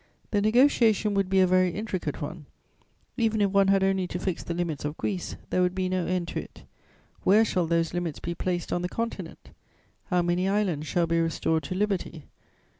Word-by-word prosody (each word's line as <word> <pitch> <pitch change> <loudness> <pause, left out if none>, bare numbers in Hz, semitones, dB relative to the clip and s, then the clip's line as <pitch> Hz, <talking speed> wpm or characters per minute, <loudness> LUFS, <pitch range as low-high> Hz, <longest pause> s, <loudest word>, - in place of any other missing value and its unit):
The 205 - +2
negociation 220 -2 +4
would 195 -2 +1
be 190 0 +4
a - - +6
very 185 0 +3
intricate 180 -6 -4
one; 150 0 -7 0.7
even 225 -3 +1
if 200 -2 +2
one 200 0 +4
had 195 0 +4
only 190 -1 +1
to 175 - -4
fix 180 -1 -2
the 170 - -4
limits 170 -4 -2
of 150 +2 -4
Greece, 190 -4 -3 0.2
there 180 - +2
would 180 0 +1
be 185 -1 -1
no 185 -2 -1
end 180 -1 -1
to - - -3
it. - - -11 0.6
Where 215 +4 +5
shall 180 -5 0
those 165 0 +1
limits 175 -4 -2
be 170 - -4
placed 175 0 -2
on 175 - 0
the 180 - -2
Continent? 230 +3 -5 0.5
How 180 -2 +1
many 175 +2 +1
islands 185 -7 0
shall 175 -1 +1
be 165 0 +1
restored 165 -1 0
to 185 - -4
liberty? 190 -6 -2
185 Hz, 200 wpm, -27 LUFS, 170-200 Hz, 0.7 s, a